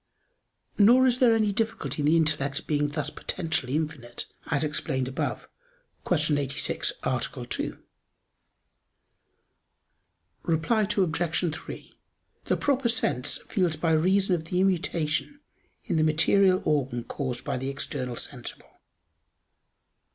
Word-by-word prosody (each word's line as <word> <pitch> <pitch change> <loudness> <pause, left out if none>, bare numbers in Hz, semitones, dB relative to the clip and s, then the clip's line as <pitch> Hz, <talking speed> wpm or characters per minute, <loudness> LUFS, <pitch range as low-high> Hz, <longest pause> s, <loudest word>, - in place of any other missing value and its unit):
Nor 240 +5 +7
is 250 -1 +3
there 235 -3 +5
any 215 -2 +2
difficulty 205 - -2
in 145 - +2
the 160 +2 +5
intellect 145 -3 0
being 145 -1 +1
thus 150 0 -3
potentially 155 -6 -2
infinite, 150 -7 -3 0.2
as 145 -2 +1
explained 150 -3 -1
above 130 - -3 0.6
(Q. 155 -4 +2
86, 140 0 -1
A. - - 0 0.3
2). - - -2 2.6
Reply 185 +7 +1
Obj. 170 -2 +1
3: - - -9 0.5
The - - +1
proper 275 -4 +1
sense 220 - 0
feels 180 -6 +1
by 160 +1 0
reason 185 +4 +3
of 165 -2 -1
the 180 +2 -1
immutation 185 - 0 0.5
in 175 -8 0
the 155 - +3
material 185 +5 +4
organ 135 -5 0
caused 130 -2 -4
by - - -2
the 130 +2 -3
external 130 -2 -3
sensible. - - -7
160 Hz, 120 wpm, -27 LUFS, 145-195 Hz, 2.6 s, Nor